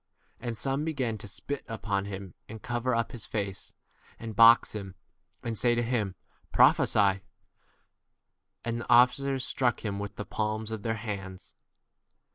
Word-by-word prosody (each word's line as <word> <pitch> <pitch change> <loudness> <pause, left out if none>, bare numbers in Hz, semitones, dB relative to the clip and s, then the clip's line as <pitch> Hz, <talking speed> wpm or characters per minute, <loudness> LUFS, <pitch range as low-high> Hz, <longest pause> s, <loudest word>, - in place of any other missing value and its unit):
And 115 -2 -4
some 135 +5 -1
began 130 -9 -2
to - - -7
spit 140 +7 -5
upon 100 -4 -2
him, 95 -3 -7 0.2
and 110 +1 -8
cover 120 +2 -1
up 115 0 -1
his 120 -5 -6
face, 100 -3 -4 0.4
and 115 -2 -7
box 115 +2 +7
him, 100 -3 -6 0.5
and 115 -1 -3
say 120 +2 +3
to 120 - +1
him, 110 -6 -1 0.4
Prophesy; 100 -2 +4 1.4
and 115 0 -2
the - - -9
officers 125 +2 +4
struck 125 -3 0
him 100 -1 -2
with 100 0 -5
the 105 - -5
palms 110 0 -2
of 110 -2 -4
their 115 +1 -1
hands 100 -4 -6
115 Hz, 150 wpm, -29 LUFS, 100-120 Hz, 1.4 s, box